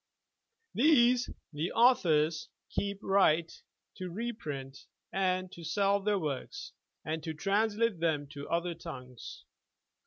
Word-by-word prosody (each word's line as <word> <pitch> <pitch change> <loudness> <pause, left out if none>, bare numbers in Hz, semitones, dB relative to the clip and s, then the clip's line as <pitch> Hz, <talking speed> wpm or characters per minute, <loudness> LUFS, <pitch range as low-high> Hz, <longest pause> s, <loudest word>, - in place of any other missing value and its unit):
These 250 -3 +4 0.2
(the 155 +4 -2
authors) 170 -6 +3 0.2
keep 200 0 -2
the - - -13
right 170 -4 +3 0.4
to 185 -1 -5
re 230 +7 -3
print 140 - -7 0.3
and 185 -1 0
to 170 - -10
sell 200 +5 +2
their 205 +1 +1
works, 155 - -4 0.3
and 160 +1 -2
to 160 -1 -4
translate 210 +3 +1
them 160 -3 +1
into 145 0 -9
other 170 +1 0
tongues. 130 -7 -9
180 Hz, 125 wpm, -31 LUFS, 155-205 Hz, 0.4 s, These